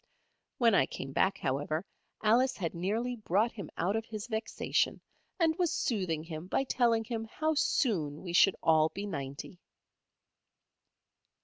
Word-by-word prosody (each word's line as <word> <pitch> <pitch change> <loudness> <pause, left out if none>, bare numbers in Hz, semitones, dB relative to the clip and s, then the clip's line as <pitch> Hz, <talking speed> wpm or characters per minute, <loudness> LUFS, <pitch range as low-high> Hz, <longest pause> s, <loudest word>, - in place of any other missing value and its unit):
When 230 -3 +4
I 160 -9 +4
came 135 - -6
back, 190 +8 +2
however, 145 +5 -2 0.4
Alice 240 +5 +3
had 170 -5 -2
nearly 220 +8 -1
brought 215 +2 +1
him 200 -7 -8
out 185 +5 0
of 225 - -1
his 215 -1 -6
vexation, 220 -1 -1 0.4
and 325 -2 +3
was 350 -3 +2
soothing 180 -9 -1
him 165 +1 -7
by 270 - +1
telling 235 -4 +2
him 225 -1 -4
how 310 +8 -1
soon 165 - 0
we 175 -2 -5
should 190 +2 +6
all 160 -1 +4
be 200 +6 -5
ninety. 140 0 -6
200 Hz, 145 wpm, -31 LUFS, 160-230 Hz, 0.4 s, should